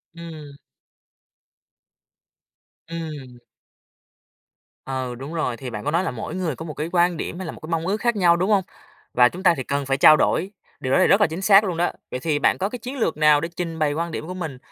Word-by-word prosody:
Ừm. 155 -4 -10 2.3
Ừm. 150 -7 -7 1.5
Ừ, 130 -2 -4
đúng 140 +6 -8
rồi, 140 -7 -2
thì 130 0 -6
bạn 105 -3 -6
có 150 - 0
nói 170 +4 +1
là 165 - -2
mỗi 120 +7 -6
người 175 -7 -2
có 160 - -8
một 155 - -6
cái 150 +4 -4
quan 175 -1 +2
điểm 175 - -5
hay 190 - -5
là 160 - -5
một - - -12
cái 155 - -10
mong 165 +1 -1
ước 205 - 0
khác 235 0 0
nhau, 175 -3 +4
đúng 185 +4 0
hông? 195 -2 +3 0.5
Và 125 0 +6
chúng 185 +7 -9
ta 175 - +6
thì 130 - -3
cần 140 +2 -2
phải 135 0 0
trao 155 +2 +8
đổi, 190 +3 +1 0.3
điều 130 +1 -2
đó - - +4
thì - - +5
rất 200 +2 +4
là 205 - +5
chính 160 +4 -6
xác 195 +1 +6
luôn 180 -5 -2
đó. 175 - +1 0.2
Vậy 125 - -3
thì 145 +1 0
bạn - - +2
có 195 +1 -1
cái 245 - -7
chiến 255 +5 -7
lược 165 - 0
nào 150 -1 +5
để 165 - -3
trình 165 -2 -4
bày 150 -2 +1
quan 165 +2 -3
điểm 155 - -5
của 185 - -5
mình, 160 -8 -5
165 Hz, 240 wpm, -23 LUFS, 145-180 Hz, 2.3 s, trao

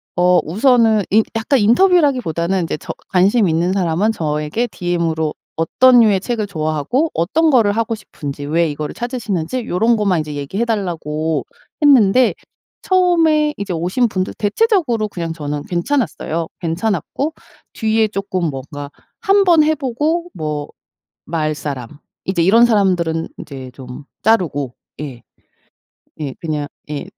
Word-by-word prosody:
어 180 0 +4
우선은 225 - +3
인 220 +2 +5
약간 225 +5 +1
인터뷰라기보다는 235 - +3
인제 165 - -2
저 - - -7 0.2
관심이 195 +2 +3
있는 170 +3 +1
사람은 190 +2 +1
저에게 150 +7 -2
DM으로 170 -5 -1 0.2
어떤 245 +10 +4
류의 210 -5 +4
책을 220 -1 -2
좋아하고 160 - -1
어떤 315 - +2
거를 230 -8 +4
하고 225 +1 -1
싶은지, 145 -8 -7
왜 165 +2 +1
이거를 150 0 -5
찾으시는지 235 -3 -3
요런 225 +6 +2
것만 200 -5 +1
인제 150 -1 -4
얘기해 145 +11 -2
달라고 160 -8 -2 0.4
했는데 255 -4 +5 0.5
처음에 330 -5 +3
이제 200 -2 -4
오신 180 +9 +1
분들 185 -3 -2
대체적으로 245 - +1
그냥 170 -5 -5
저는 145 -2 -4
괜찮았어요. 170 - -1
괜찮았고 200 - -2 0.4
뒤에 220 0 +1
쪼끔 195 -3 -3
뭔가 140 +1 -7 0.3
한번 390 -7 +4
해보고 305 +3 -1
뭐 150 -3 -4 0.6
말 155 -2 -1
사람 140 -4 -5 0.4
이제 185 -3 0
이런 220 +7 +6
사람들은 180 -7 +1
이제 135 -3 -8
좀 125 +1 -10 0.2
자르고 155 - +1 0.3
예. 130 -6 -7 1.0
예. 145 -4 -4
그냥 155 -3 -3 0.2
예 145 -1 -4
190 Hz, 305 characters per minute, -18 LUFS, 160-235 Hz, 1.0 s, 이런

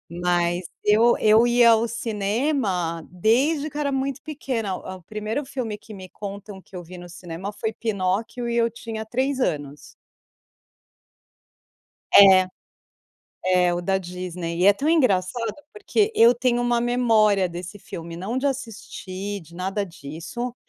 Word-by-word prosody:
Mas 175 0 +1 0.2
eu 220 +3 +5
eu 220 +2 +5
ia 240 -1 +6
ao 225 +1 +3
cinema 210 - -1
desde 265 - +1
que 295 - -9
eu - - -1
era 285 -1 0
muito 270 0 -2
pequena. 260 - -3
O 185 +1 -8
o 175 - -23
primeiro 215 - -4
filme 255 -5 -4
que 215 - -13
me 190 -2 -9
contam 200 0 -8
que 190 - -16
eu 180 - -6
vi 180 +2 -11
no 175 0 -11
cinema 175 +2 -7
foi 220 +1 -4
Pinóquio 215 +3 -2
e 235 - -1
eu 230 0 +3
tinha 225 -1 -7
3 260 +4 -1
anos. 145 - -3 2.2
É. 190 -2 +8 1.0
É 180 -1 +3
o 175 - -1
da 190 +2 0
Disney. 180 -2 -5
E 185 - +4
é 200 - +8
tão 275 - -3
engraçado, 230 - +1 0.2
porque 425 +1 0
eu 235 - +6
tenho 240 0 +1
uma 240 0 +1
memória 225 -5 +3
desse 175 +3 -8
filme, 170 -3 -8
não 190 +8 -4
de 260 +2 0
assistir, 205 -6 -5
de 170 0 -16
nada 190 +3 -2
disso, 175 - -7
210 Hz, 155 wpm, -23 LUFS, 180-240 Hz, 2.2 s, É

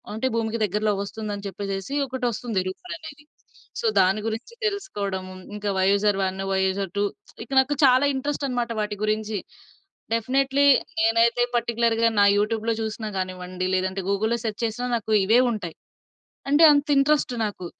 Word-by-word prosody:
అంటే 260 +4 -1
భూమికి 225 0 -2
దగ్గరలోకొస్తుందని 205 0 -3
జెప్పేసేసి, 195 +6 -5
ఒకటొస్తుంది 240 -5 -2
రూమరనేది. 315 - -9 0.5
సో, 465 - 0
దాని 190 +3 +3
గురించి 225 - -5
తెలుసుకోడము, 200 - -3 0.2
ఇంకా 210 0 -3
వయూజర్ 200 +1 +3
1, 190 +1 -4
వయూజర్ 190 0 0
2 205 - +2 0.4
ఇక 245 - -17
నాకు 265 +2 +2
చాలా 260 +2 +5
ఇంట్రెస్టనమాట 265 -4 -2
వాటి 210 0 -2
గురించి. 215 0 -1 0.8
డెఫినెట్లీ 270 +4 +1 0.4
నేనయితే 230 +2 +3
పర్టిక్యులర్‌గా 230 -1 +2
నా - - +7
యూట్యూబ్‌లో 220 +2 0
చూసినా 220 0 -4
గానివ్వండి, 185 0 -4
లేదంటే 190 +1 -1
గూగుల్‌లో 220 +4 +1
సెర్చ్ 215 -1 -3
చేసినా, 230 +2 -2
నాకు 220 -1 -4
ఇవే 225 +5 +4
ఉంటాయి. 180 -7 -5 0.8
అంటే 295 +3 +6
అంత 285 0 +2
ఇంట్రెస్టు 280 -3 +2
నాకు. 185 -3 -6
220 Hz, 130 wpm, -24 LUFS, 200-250 Hz, 0.8 s, నా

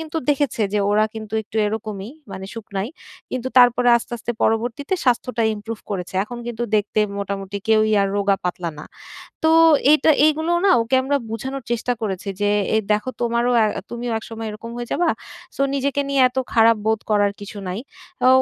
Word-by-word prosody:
কিন্তু 320 0 -6
দেখেছে 280 -6 +1
যে - - +3
ওরা 215 +1 +4
কিন্তু 220 -1 -8
একটু 215 - -10
এরকমই 215 0 -4 0.2
মানে 190 - -6
শুকনাই। 205 -2 -4 0.4
কিন্তু 255 0 -3
তারপরে 245 0 +5
আস্তে, 235 - -6
আস্তে 235 - -5
পরবর্তীতে 240 +9 0
স্বাস্থ্যটা 250 -1 +1
improve 215 +1 -7
করেছে। 185 -2 -4
এখন 240 +2 -8
কিন্তু 240 0 -4
দেখতে 210 +1 0 0.2
মোটামুটি 200 0 -4
কেউই 215 0 +4
আর 195 - +1
রোগা-পাতলা 185 -3 -1
না। 150 - -8 0.6
তো 320 - +5 0.4
এইটা 305 0 +4 0.2
এইগুলো 315 +2 +1
না 390 - +6
ওকে 230 +3 0
আমরা 280 +2 +1
বুঝানোর 265 +4 -4
চেষ্টা 240 +1 0
করেছি। 195 -1 -3
যে 205 - +2 0.3
এ - - +5
"দেখো 210 +4 +1
তোমারও 235 +1 +1
আ - - +4 0.2
তুমিও 240 0 -4
একসময় 225 0 -7
এরকম 215 +2 -8
হয়ে 240 -1 -5
যাবা। 345 -1 +2 0.5
So - - -2
নিজেকে 280 0 0
নিয়ে 275 -1 +3
এত 255 - -12 0.2
খারাপ 225 0 +5
বোধ 220 -1 +2
করার 205 -1 +3
কিছু 205 +1 -9
নাই।" 185 +4 -3 0.4
অ্যা 255 - +5
225 Hz, 175 wpm, -21 LUFS, 210-250 Hz, 0.6 s, না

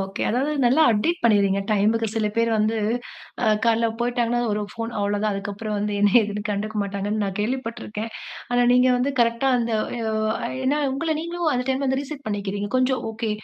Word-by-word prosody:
Okay 195 0 -4
அதாவது 270 +6 0
நல்லா 265 +7 +5
update 325 +12 +1
பண்ணிர்றீங்க 200 -3 +3
டைமுக்கு. 220 +2 +2
சில 220 -1 +1
பேர் 230 0 +2
வந்து, 215 +1 +1 0.7
அ - - +2 0.2
காலைல 230 0 +3
போயிட்டாங்கன்னா, 240 0 0
ஒரு 210 0 -1
ஃபோன் 230 0 -4
அவ்வளோதான். 205 +1 0
அதுக்கப்புறம் 205 +2 -4
வந்து 210 0 -1
என்ன 205 -1 +4
ஏதுன்னு 205 0 -4
கண்டுக்க 210 +1 -3
மாட்டாங்கன்னு 200 +2 -2
நான் 195 -1 -4
கேள்விப்பட்ருக்கேன். 230 -2 -4 0.4
ஆனா 245 0 +3
நீங்க 250 +1 +5
வந்து 270 +3 0
கரெக்ட்டா, 235 +3 +2
அந்த 230 -1 -1 0.3
எ - - -3
-ஓ - - -1 0.5
ஏன்னா, 290 +3 +2
உங்கள 315 +3 -1
நீங்களும் 340 -1 -1
அந்த 250 0 -1
டைம் 265 +1 0
வந்து 265 +1 +1
ரீசெட் 285 -1 -8
பண்ணிக்கிறீங்க. 205 0 -3
கொஞ்சம் 255 0 +1
ஓகே 220 0 -3
225 Hz, 180 wpm, -23 LUFS, 205-255 Hz, 0.7 s, நல்லா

